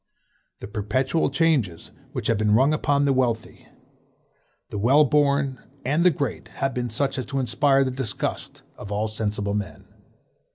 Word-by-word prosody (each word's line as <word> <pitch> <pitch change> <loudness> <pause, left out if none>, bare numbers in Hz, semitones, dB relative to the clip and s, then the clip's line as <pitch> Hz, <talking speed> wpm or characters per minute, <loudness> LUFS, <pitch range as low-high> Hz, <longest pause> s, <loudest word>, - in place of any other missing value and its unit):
The - - -6
perpetual 130 +10 0
changes 135 - 0 0.2
which - - -5
have 115 -3 +1
been 105 -1 +3
rung 135 +6 +4
upon 145 -2 +1
the 140 - +3
wealthy, 120 -4 -1 1.0
the 105 - -3
well 135 +8 +5
born, 140 -2 +2 0.3
and 150 +6 +2
the 180 - +7
great, 140 -5 -3
have 135 0 -3
been 125 -1 -2
such 135 +4 -1
as 130 - -5
to 135 0 -2
inspire 135 +3 +3
the 130 - -1
disgust 125 -6 -4
of 105 - -9
all 105 +2 0
sensible 105 -1 -2
men. 105 -3 -4
130 Hz, 160 wpm, -24 LUFS, 110-140 Hz, 1.0 s, the